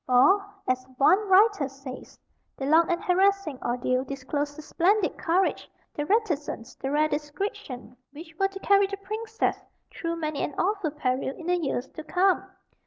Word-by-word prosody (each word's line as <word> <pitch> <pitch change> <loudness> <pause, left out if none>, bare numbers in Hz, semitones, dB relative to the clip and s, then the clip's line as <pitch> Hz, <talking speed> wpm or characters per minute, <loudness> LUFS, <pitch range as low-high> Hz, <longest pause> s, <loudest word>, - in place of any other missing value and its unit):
For, 260 +11 +5 0.2
as 255 0 +1
one 385 +9 +4
writer 385 -7 +5
says: 270 -1 -10 0.4
"The 270 - -3
long 325 +4 +4
and 345 - -1
harassing 375 -5 +2
ordeal 250 +1 0
disclosed 285 +2 -4
the 310 - -8
splendid 375 +5 +1
courage, 360 +3 0 0.2
the 295 0 -3
reticence, 310 - -1
the 270 - -5
rare 300 +2 +3
discretion, 295 - -5 0.2
which 320 +3 -11
were 390 - +4
to 390 0 -9
carry 400 0 +4
the 395 0 -5
Princess 435 +3 -2 0.3
through 335 -1 -3
many 310 -3 -3
an 290 - -3
awful 395 -3 0
peril 265 -2 -2
in 335 - -9
the 360 +1 +2
years 275 -6 -2
to 315 - -9
come. 370 +3 +2
320 Hz, 165 wpm, -26 LUFS, 275-390 Hz, 0.4 s, For